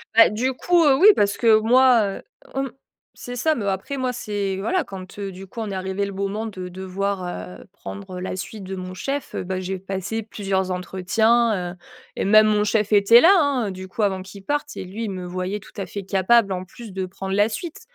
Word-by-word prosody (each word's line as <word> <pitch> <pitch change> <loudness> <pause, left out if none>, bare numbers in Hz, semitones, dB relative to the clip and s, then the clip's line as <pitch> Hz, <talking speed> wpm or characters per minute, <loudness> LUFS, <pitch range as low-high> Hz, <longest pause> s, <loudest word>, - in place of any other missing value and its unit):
Bah, 230 - +8
du 250 +5 -1
coup, 350 +5 +3
heu, 285 -3 +5
oui, 365 +10 +6
parce 205 0 +1
que 225 -2 +5
moi, 245 +1 +5
heu, - - -10 0.4
mmh 270 - -3 0.5
c'est 245 0 -7
ça, 315 +6 +2
mais 220 -8 -3
après 195 +9 -2
moi, 255 -1 -1
c'est 205 -5 -3
voilà 355 - 0
quand, 190 -3 -10
heu, 195 -1 -4
du 190 +1 -10
coup 195 - -10
on 220 -2 -3
est 195 - -4
arrivé 190 +1 -2
le 200 - -3
moment 200 +3 -3
de 185 -4 -6
devoir, 190 +1 -3 0.4
heu, - - -12
prendre 200 -2 -8
la 185 0 -4
suite 200 +2 -7
de 190 +1 -5
mon 185 0 -7
chef. 275 +9 -4
Heu, - - -2
bah 185 0 -3
j'ai 190 +1 -3
passé 195 +4 -4
plusieurs 195 -3 -2
entretiens, 190 +2 +1
heu, - - -15 0.4
et - - -2
même 215 +2 +6
mon 210 -1 +3
chef 210 0 +1
était 210 +3 +7
là, 340 - +7
hein. 275 -8 +1
Du 185 0 -7
coup, 190 - -5
avant 190 -2 0
qu'il 195 +1 -12
parte 290 +6 -2
et - - -4
lui 205 +5 -6
il 215 - -3
me 185 -1 -5
voyait 185 +3 -3
tout - - -16
à 195 - -2
fait 200 +2 -6
capable 195 +3 +3
en 185 -1 -2
plus 220 +3 -11
de 190 0 -3
prendre 190 +1 -5
la 205 +2 +3
suite, 315 +9 -6
200 Hz, 230 wpm, -23 LUFS, 190-230 Hz, 0.5 s, Bah